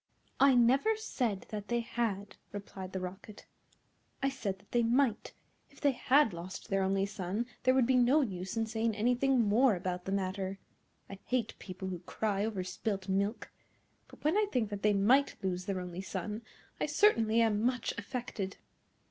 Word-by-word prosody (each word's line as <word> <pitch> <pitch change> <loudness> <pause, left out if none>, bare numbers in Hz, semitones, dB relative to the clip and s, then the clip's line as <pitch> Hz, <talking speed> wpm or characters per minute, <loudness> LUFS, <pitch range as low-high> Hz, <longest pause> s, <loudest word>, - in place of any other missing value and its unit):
"I 275 -1 +6
never 265 - +4
said 240 - -2
that 210 -1 -5
they 240 0 +1
had," 210 -4 -2 0.2
replied 195 -2 -7
the 190 - -3
Rocket; 190 +3 -8 0.8
"I 275 - +3
said 210 -8 -3
that 200 +2 -25
they 240 - +3
might. 235 0 +1 0.4
If - - -19
they 285 - +3
had 260 -2 +3
lost 175 +6 -7
their 195 -1 +1
only 195 +1 +1
son 200 +3 -3 0.2
there 255 +1 +3
would 260 -2 +4
be 255 +1 +3
no 250 +5 +5
use 190 -4 -3
in 225 - +1
saying 220 0 -1
anything 245 +3 +2
more 225 +2 +4
about 180 0 -4
the 190 - -3
matter. 190 0 -2 0.5
I 195 - -9
hate 245 -4 -1
people 190 0 -6
who 180 -2 -4
cry 200 +3 -1
over 210 -4 -2
spilt 195 +1 -3
milk. 200 +4 -1 0.6
But - - -17
when 305 +4 +2
I 425 0 +3
think 220 -4 0
that 205 -1 -4
they 210 +1 +3
might 245 +8 +4
lose 180 -1 -2
their 195 -1 -2
only 180 0 -5
son, 205 +3 -4 0.4
I - - 0
certainly 230 - +4
am 215 -2 +2
much 250 0 0
affected." 205 -3 -5
210 Hz, 180 wpm, -32 LUFS, 190-245 Hz, 0.8 s, I